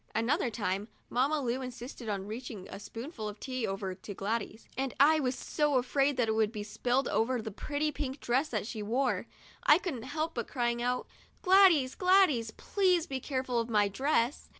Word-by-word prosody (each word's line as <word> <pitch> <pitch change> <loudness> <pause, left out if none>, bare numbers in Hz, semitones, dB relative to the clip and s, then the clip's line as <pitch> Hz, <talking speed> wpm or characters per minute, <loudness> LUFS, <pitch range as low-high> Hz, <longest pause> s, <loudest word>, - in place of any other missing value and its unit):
Another 245 - +1
time, 205 -2 -2 0.2
Mamma 275 +5 +2
Lu 250 0 -1
insisted 250 -2 -7
on 195 -2 -2
reaching 215 -3 -7
a 195 - -7
spoonful 230 +1 -6
of 210 0 -10
tea 255 -3 -3
over 195 -1 -3
to 200 +2 -9
Gladys, 220 +2 -3
and 265 0 -2
I 310 +3 +6
was 255 -3 0
so 295 +1 0
afraid 270 +2 +1
that 245 -3 +2
it - - +2
would 220 -1 +2
be 210 -2 -5
spilled 245 +5 0
over 245 +3 +1
the 220 -1 -5
pretty 295 +8 -2
pink 280 -2 -4
dress 260 +5 0
she 220 -1 -5
wore 240 +6 0
that - - -3
I 300 - +9
couldn't 335 -10 -4
help 310 +6 -3
crying 240 -1 -1
out: 250 +1 0 0.4
'Gladys! 365 - +6
Gladys! 365 - +4
please 365 - +1
be 265 -1 -4
careful 260 -2 -1
of 230 0 -2
my 210 -2 +3
dress." 260 +4 0
250 Hz, 185 wpm, -31 LUFS, 220-285 Hz, 0.4 s, I